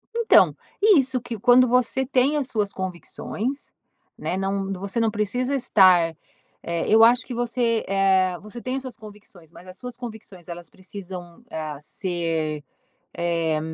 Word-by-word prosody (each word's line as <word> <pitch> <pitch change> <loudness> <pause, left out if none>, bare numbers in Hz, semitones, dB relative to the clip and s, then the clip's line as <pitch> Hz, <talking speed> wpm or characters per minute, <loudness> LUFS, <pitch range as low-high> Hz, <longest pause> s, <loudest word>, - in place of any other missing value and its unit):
Então, 465 -1 +5 0.3
isso 270 - +4
que 230 -1 -6
quando 245 +3 +6
você 250 +2 +1
tem 270 +3 +2
as 275 -3 -1
suas 210 -5 -1
convicções, 195 +8 -5 0.4
né. 185 - -3
Não 195 0 -2
você 200 +4 -3
não 225 -1 +2
precisa 245 +6 -1
estar, 185 -9 +4 0.5
eh, 170 -1 -2
eu 220 +1 +7
acho 240 +2 +5
que 250 - -6
você, 235 -1 0
eh, 190 -2 +2
você 215 +3 -10
tem 255 +1 -3
as 270 - -3
suas 255 -3 -8
convicções, 205 -6 -14
mas 180 +2 -15
as 185 - -11
suas 250 +1 -7
convicções 220 -7 -9
elas 170 0 -8
precisam, 185 0 -9
ah, 155 -2 -5
ser, 165 -3 -2 0.5
eh, 165 -2 0
205 Hz, 155 wpm, -24 LUFS, 180-245 Hz, 0.5 s, eu